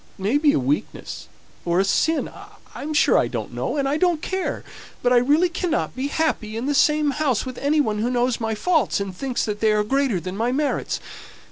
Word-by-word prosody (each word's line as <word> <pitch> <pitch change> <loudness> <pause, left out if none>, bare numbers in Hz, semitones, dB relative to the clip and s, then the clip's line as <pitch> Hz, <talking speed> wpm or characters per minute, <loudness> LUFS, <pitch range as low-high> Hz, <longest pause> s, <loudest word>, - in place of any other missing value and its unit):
It - - -13
may 235 +9 +2
be 295 -1 +4
a - - +2
weakness, 135 +3 -3 0.4
or 175 +1 +1
a - - +4
sin, 320 +10 +1 0.5
I'm 305 - -5
sure 300 - +4
I - - +1
don't - - -5
know, - - -2
and 275 -1 +1
I 285 +2 +1
don't 345 -1 +2
care; 375 +3 -3 0.4
but 250 0 +3
I - - +6
really 295 +8 +4
cannot 345 -1 -2
be 260 +2 -2
happy 285 -8 -1
in 235 - -3
the 290 - +1
same 300 0 +3
house 280 -6 0
with 255 -1 -6
any 295 +2 +2
one 215 -6 -1
who 230 +3 0
knows 245 0 0
my 225 -1 -1
faults, 240 - +1
and 195 -2 -4
thinks 260 +3 -2
that 210 -1 -3
they 220 -1 +3
are 210 0 +2
greater 265 -3 +1
than 185 +2 -6
my 230 +4 0
merits. 290 +2 -1
260 Hz, 225 wpm, -22 LUFS, 215-300 Hz, 0.5 s, I